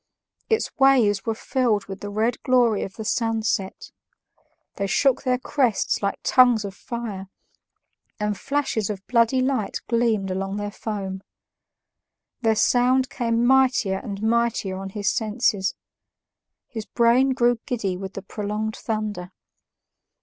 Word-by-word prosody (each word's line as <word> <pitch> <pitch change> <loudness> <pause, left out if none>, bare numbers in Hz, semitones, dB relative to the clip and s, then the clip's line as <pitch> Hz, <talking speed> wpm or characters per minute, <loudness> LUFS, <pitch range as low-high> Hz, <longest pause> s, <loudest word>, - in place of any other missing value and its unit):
Its 445 -1 0
waves 235 -8 +4
were 225 - 0
filled 230 -4 0
with 195 0 -8
the 205 - -6
red 220 +4 -1
glory 245 -4 +3
of 190 - -6
the 220 - -7
sunset; 220 -4 -1 0.9
they 200 - -1
shook 270 +5 +2
their 255 -1 +1
crests 250 -4 0
like 200 -1 -1
tongues 245 -4 +4
of 195 - -6
fire, 215 -4 -6 0.9
and 210 0 -1
flashes 270 -4 -1
of 195 -2 -5
bloody 240 +2 +3
light 255 -5 -1
gleamed 225 -5 +1
along 195 +1 -3
their 205 0 -4
foam. 195 -3 -5 1.2
Their 225 -2 +2
sound 250 +3 +3
came 235 -1 0
mightier 255 -7 +3
and 205 -4 -6
mightier 225 -4 0
on 195 0 -6
his 200 0 -4
senses; 215 -3 0 0.9
his 220 -3 -7
brain 250 +3 +3
grew 240 -2 +2
giddy 205 -7 -2
with 190 +1 -7
the 195 - -6
prolonged 210 +2 -3
thunder. 210 -5 -4
220 Hz, 135 wpm, -23 LUFS, 200-245 Hz, 1.2 s, waves